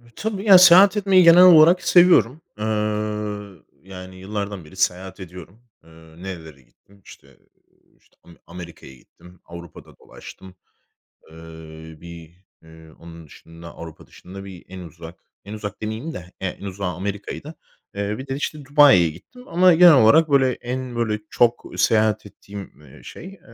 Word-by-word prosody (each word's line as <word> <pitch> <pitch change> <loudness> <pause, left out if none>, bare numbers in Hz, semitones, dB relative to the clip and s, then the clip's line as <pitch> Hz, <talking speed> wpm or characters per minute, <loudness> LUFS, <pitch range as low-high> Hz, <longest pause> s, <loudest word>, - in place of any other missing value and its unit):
Tabii, 210 -2 -5
ya, 200 -3 +7
seyahat 190 +3 +6
etmeyi 195 -2 +3
genel 170 +1 +7
olarak 175 0 +6
seviyorum. 175 -6 +3 0.2
Iıı, 105 -2 -4 0.2
yani, 95 -1 -12
yıllardan 100 -2 -7
beri 75 - -17
seyahat 95 +1 -3
ediyorum. 90 +2 -13 0.2
Iıı, 80 +1 -18
nerelere 80 -7 -10
gittim? 95 +11 -28
İşte, 70 -1 -18 0.6
işte, - - -34
ame 85 - -18
Amerika'ya 85 -6 -12
gittim. 90 +7 -21
Avrupa'da 85 0 -14
dolaştım. 95 -1 -15 0.8
Eee, 80 - -16 0.6
bir, 85 -2 -13 0.3
ııı, 80 -1 -18
onun 85 -1 -14
dışında, 85 +3 -16
Avrupa 80 -1 -12
dışında, 95 +2 -13
bir, 95 -3 -13
en 95 0 -11
uzak, 85 -1 -13 0.3
en 100 - -10
uzak 105 -2 -8
demeyeyim 110 +9 -6
de, - - -7 0.2
ya, 95 - -2
en 100 - -13
uzağı 95 -1 -5
Amerika'ydı. 100 - -7 0.4
Eee, 100 +1 -4
bir 130 +2 -10
de, 135 - -4
işte, 145 0 -6
Dubai'ye 140 - +4
gittim, 250 - -16
ama 180 +1 +3
genel 170 0 +6
olarak, 145 +6 +4
böyle, 135 -2 +2
en 125 0 -7
böyle, 110 -2 -2
çok 120 -1 0
seyahat 110 -1 0
ettiğim, 100 -4 -13
eee, 65 -3 -18
şey, - - -12
eee, 195 - -19
100 Hz, 150 wpm, -20 LUFS, 85-135 Hz, 0.8 s, ya